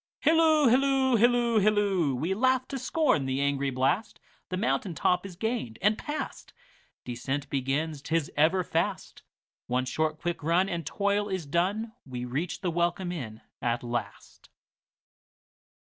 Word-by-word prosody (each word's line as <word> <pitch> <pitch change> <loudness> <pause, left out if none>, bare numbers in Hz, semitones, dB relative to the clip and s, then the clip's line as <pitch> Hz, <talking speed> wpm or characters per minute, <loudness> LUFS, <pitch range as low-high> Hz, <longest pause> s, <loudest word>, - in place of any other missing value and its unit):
Hilloo, 315 -1 +4
hilloo, 265 +1 +3
hilloo, 240 -1 +4
hilloo! 200 -8 +2
We 160 +9 -1
laugh 255 +4 +2
to 270 - -4
scorn 255 - +1
the 130 +1 -1
angry 140 0 0
blast, 135 - 0 0.3
The 185 - -2
mountain 150 +4 -1
top 180 +4 +1
is 180 - -11
gained 220 - -3
and 210 +3 +3
past. 295 +7 -6 0.5
Descent 135 +3 -3
begins, 140 +3 -1
't 160 +3 -2
is 165 -3 0
ever 165 +5 +3
fast—One 165 -8 -4
short 155 +4 -1
quick 175 0 -3
run, 170 +5 +2
and 170 -3 -4
toil 205 0 0
is 185 -4 -3
done, 190 +9 0
We 125 -2 -6
reach 150 +8 -3
the 180 -3 -1
welcome 175 +2 0
inn 115 -11 -6 0.2
at 120 0 -1
last. 120 0 -6
175 Hz, 145 wpm, -28 LUFS, 140-215 Hz, 0.5 s, Hilloo